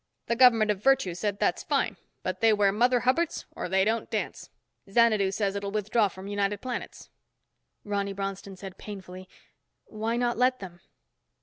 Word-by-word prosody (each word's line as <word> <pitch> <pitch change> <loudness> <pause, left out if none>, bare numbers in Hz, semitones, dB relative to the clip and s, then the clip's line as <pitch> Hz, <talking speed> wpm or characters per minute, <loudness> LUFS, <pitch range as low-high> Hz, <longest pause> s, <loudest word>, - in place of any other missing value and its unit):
The 235 - 0
government 230 -4 +6
of 200 -2 -4
Virtue 270 -8 +3
said 200 +3 -2
that's - - +1
fine - - 0 0.3
but 185 0 -3
they 225 -1 +5
wear 205 -1 +3
Mother 245 +4 +3
Hubbards 305 +7 0
or - - -5
they 190 +1 +3
don't 225 +2 -1
dance. - - -4 0.4
Xanadu 215 -2 +4
says 195 0 -1
it'll 200 0 -3
withdraw 215 +1 +1
from 190 0 -10
United 205 0 -1
Planets." 250 +1 -6 0.7
Ronny 200 -1 -2
Bronston 195 0 -5
said 190 0 -10
painfully, 185 -2 -9 0.6
"Why 225 +2 -3
not 240 -1 0
let 255 +1 +3
them?" 175 -3 -10
205 Hz, 165 wpm, -27 LUFS, 195-230 Hz, 0.7 s, government